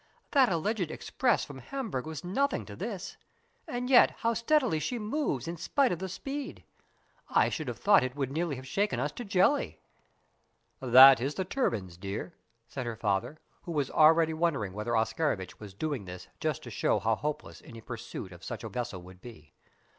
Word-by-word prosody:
"That 265 -6 +5
alleged 180 +1 -1
express 245 +8 0
from 140 -2 -10
Hamburg 195 - -4
was 160 0 -6
nothing 275 +11 0
to - - -9
this: - - -6 0.5
and 245 +1 -3
yet 255 -1 +7
how 230 0 0
steadily 235 - +2
she 240 - -2
moves 215 - -2
in 170 +1 -4
spite 275 - +1
of 175 - -2
the 190 - -4
speed. 275 +8 -6 0.7
I - - +3
should - - -4
have - - -4
thought 200 -1 +5
that 130 - 0
it - - -23
would 135 -3 -2
have - - -8
nearly 155 -5 -2
shaken 200 - -1
us 145 +3 -1
to 245 - -7
jelly." 200 +7 +2 1.0
"That 130 0 +8
is 140 +4 -2
the 190 - -2
turbines, 105 - -2
dear," 100 - -5 0.3
said 130 -3 -5
her 115 -2 -4
father, 105 +8 -1 0.2
who 170 - -6
was 145 -4 -1
already 160 +1 +5
wondering 150 - -1
whether 110 +3 -1
Oscarovitch 110 - -1
was 100 -3 -10
doing 140 -3 -3
this 90 0 -9
just - - -2
to - - -8
show - - +1
how 115 - +1
hopeless 150 +6 -4
any 115 - -11
pursuit 115 -4 -7
of 85 0 -13
such 120 -3 -6
a 110 - -5
vessel 110 -4 -5
would 90 +1 -14
be. 110 -11 -13
145 Hz, 190 wpm, -29 LUFS, -, 1.0 s, That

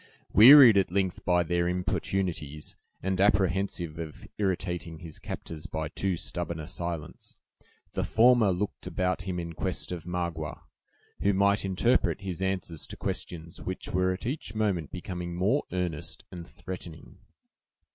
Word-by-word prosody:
Wearied 120 0 +10
at 95 -2 +3
length 95 -2 0
by 90 -1 +3
their 85 +1 0
importunities, 90 -4 -2 0.3
and 95 0 0
apprehensive 95 -4 +1
of 80 -2 -7
irritating 90 -4 -2
his 80 -1 -8
captors 80 0 -7
by 80 -1 -3
too 95 -3 -1
stubborn 85 0 -3
a 80 - -5
silence, 85 -1 -5 0.6
the - - -1
former 115 -3 +5
looked 95 +3 -3
about 90 0 -1
him 90 -2 -2
in 85 -1 -5
quest 80 - -2
of 85 -2 -5
Magua, 85 -3 -3 0.6
who 100 - +3
might 100 +1 +3
interpret 100 +3 +2
his 95 -2 -5
answers 95 -4 -2
to - - -8
questions 85 -1 -4
which 95 - -5
were 90 +1 +2
at 95 - -5
each 125 -4 -4
moment 100 -8 0
becoming 90 -1 -5
more 100 +11 +1
earnest 90 -4 -3
and 85 -2 -8
threatening. 85 -3 -9
90 Hz, 145 wpm, -28 LUFS, 85-95 Hz, 0.6 s, Wearied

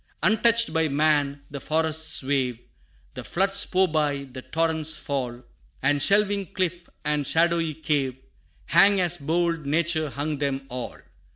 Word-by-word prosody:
Untouched 230 +2 +3
by 160 0 +2
man, 145 -1 +1
the 140 - -5
forests 160 0 -1
wave, 130 -3 -1 0.5
The - - -7
floods 195 +2 +1
pour 190 0 +3
by, 150 -3 0
the 130 -1 -10
torrents 160 0 0
fall, 125 -5 -4 0.4
And 145 +1 +2
shelving 200 +1 +1
cliff 180 -1 -2 0.2
and 150 -2 0
shadowy 165 -1 +1
cave, 145 -5 -1 0.5
Hang 200 0 +5
as 175 -1 +2
bold 165 0 -1
nature 155 0 +1
hung 145 +1 -3
them 135 -1 -2
all! 125 -1 -6
155 Hz, 135 wpm, -25 LUFS, 140-170 Hz, 0.5 s, Hang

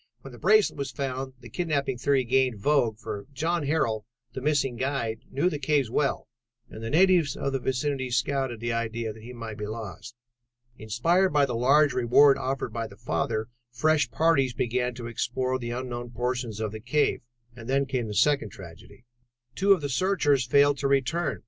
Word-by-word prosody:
"When 135 - -10
the 120 - -12
bracelet 210 -5 +3
was 140 -1 -2
found, 130 0 -4
the 120 - -11
kidnapping 140 -7 -1
theory 135 0 +2
gained 130 -1 +1
vogue, 120 -1 +1
for 105 -1 -7
John 160 +2 -1
Harrel, 115 -9 0 0.3
the 130 - -5
missing 135 -3 +1
guide, 120 -3 -2
knew 140 +6 0
the 150 -5 -1
cave 140 -4 +1
well 140 +2 0 0.4
and 110 - -9
natives 165 +4 +3
of 140 - -2
the 135 - 0
vicinity 130 +1 -1
scouted 130 -1 -1
the 120 0 -1
idea 115 -1 -2
that 110 - -14
he 120 +3 -10
might 115 -3 -7
be 105 - -4
lost. 110 +1 -7 0.6
Inspired 170 - +1
by 145 -1 +4
the 125 - -4
large 140 +5 +4
reward 135 +3 +5
offered 130 -3 -3
by 115 0 -3
the 100 -2 -15
father, 110 -1 -2 0.2
fresh 150 +5 +2
parties 140 -6 +2
began 125 +1 -1
to 120 -1 -7
explore 130 +2 -2
the 120 -1 -5
unknown 120 0 -5
portions 120 -2 -3
of 110 -2 -2
the 110 - -7
cave. 130 +7 +1 0.3
And 115 0 -10
then 140 +1 +2
came 125 -4 -2
the 105 - -5
second 145 +3 +2
tragedy. 90 +6 -13 0.5
Two 195 +9 +2
of 190 -4 +5
the 145 - -2
searchers 145 -4 +1
failed 140 +1 +4
to 140 - 0
return. 140 +4 0
130 Hz, 185 wpm, -26 LUFS, 115-145 Hz, 0.6 s, reward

